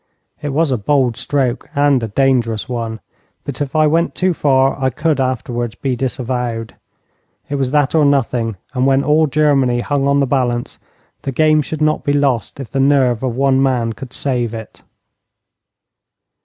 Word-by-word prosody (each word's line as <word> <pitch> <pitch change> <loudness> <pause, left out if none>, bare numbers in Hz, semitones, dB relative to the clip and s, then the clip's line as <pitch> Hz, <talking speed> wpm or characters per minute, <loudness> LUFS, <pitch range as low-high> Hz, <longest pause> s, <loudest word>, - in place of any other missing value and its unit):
It 145 - -3
was 150 +1 +1
a 125 - 0
bold 130 +1 +1
stroke 130 -2 -2
and 140 -2 +3
a 115 - -2
dangerous 120 -2 +1
one, 115 -3 -4 0.4
but 140 -1 -6
if 145 +1 -3
I 155 0 +4
went 165 +3 +1
too 185 -1 +1
far 135 -3 +2
I 130 - +3
could 155 +2 0
afterwards 120 -2 -2
be 135 -2 -2
disavowed. 125 -3 -3 0.8
It - - -1
was 135 -2 0
that 145 0 +1
or 160 -2 +4
nothing, 120 -6 +1 0.2
and 130 0 +1
when 135 0 +3
all 155 +2 +3
Germany 135 -4 +2
hung 140 +1 0
on 140 0 +3
the 140 - +3
balance 125 -2 -1 0.4
the 135 - -3
game 155 +2 +3
should 155 +1 -3
not 155 0 +1
be 145 - +1
lost 140 -4 0
if 130 -5 -7
the 135 - -1
nerve 135 -4 +3
of 130 -3 -2
one 135 0 +2
man 125 -4 +1
could 130 +1 -10
save 120 -5 -1
it. 110 -1 -10
135 Hz, 175 wpm, -17 LUFS, 120-145 Hz, 0.8 s, I